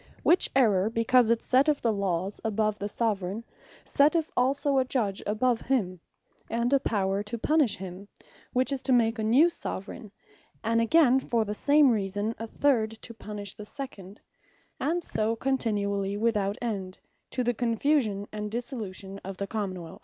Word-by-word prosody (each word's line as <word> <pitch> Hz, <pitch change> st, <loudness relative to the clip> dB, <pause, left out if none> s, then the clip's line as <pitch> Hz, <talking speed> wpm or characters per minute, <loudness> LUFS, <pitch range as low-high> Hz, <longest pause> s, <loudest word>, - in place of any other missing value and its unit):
Which 355 Hz, -, +5 dB
errour, 215 Hz, -6 st, +3 dB
because 230 Hz, +1 st, +3 dB
it 230 Hz, -1 st, +2 dB
setteth 275 Hz, +3 st, +3 dB
the 230 Hz, -2 st, +1 dB
Lawes 195 Hz, -1 st, -2 dB
above 215 Hz, -1 st, 0 dB
the 205 Hz, -, -3 dB
Soveraign, 205 Hz, -2 st, -2 dB, 0.4 s
setteth 305 Hz, +3 st, +2 dB
also 275 Hz, +2 st, +2 dB
a -, -, +3 dB
Judge 225 Hz, -7 st, -1 dB
above 225 Hz, +3 st, +1 dB
him, 190 Hz, -9 st, -1 dB, 0.5 s
and 235 Hz, +3 st, 0 dB
a 275 Hz, -, +5 dB
Power 200 Hz, -5 st, 0 dB
to 210 Hz, +3 st, -5 dB
punish 300 Hz, 0 st, +2 dB
him; 190 Hz, +1 st, -8 dB, 0.4 s
which 255 Hz, +2 st, +1 dB
is 275 Hz, -2 st, -2 dB
to 265 Hz, -, +1 dB
make 225 Hz, -1 st, +2 dB
a -, -, -1 dB
new 250 Hz, +10 st, +5 dB
Soveraign; 210 Hz, -, -6 dB, 0.5 s
and 230 Hz, +1 st, +2 dB
again 265 Hz, +1 st, +4 dB
for 235 Hz, -4 st, 0 dB
the 210 Hz, -, -3 dB
same 285 Hz, +4 st, +4 dB
reason 205 Hz, 0 st, -1 dB
a 225 Hz, -, -5 dB
third, 235 Hz, -3 st, +1 dB
to 230 Hz, -, -7 dB
punish 205 Hz, -2 st, -6 dB
the 210 Hz, -, -9 dB
second; 210 Hz, -6 st, -9 dB, 0.6 s
and 340 Hz, +3 st, 0 dB
so 220 Hz, -4 st, -1 dB
continually 205 Hz, -6 st, -1 dB
without 210 Hz, -2 st, 0 dB
end, 195 Hz, -5 st, -4 dB, 0.3 s
to 255 Hz, -, -2 dB
the 245 Hz, 0 st, +1 dB
Confusion, 230 Hz, -3 st, 0 dB
and 210 Hz, 0 st, -4 dB
Dissolution 210 Hz, -5 st, -5 dB
of 195 Hz, 0 st, -7 dB
the 200 Hz, -, -3 dB
Common 195 Hz, -4 st, -4 dB
wealth. 165 Hz, -, -11 dB
225 Hz, 165 wpm, -27 LUFS, 200-255 Hz, 0.6 s, Which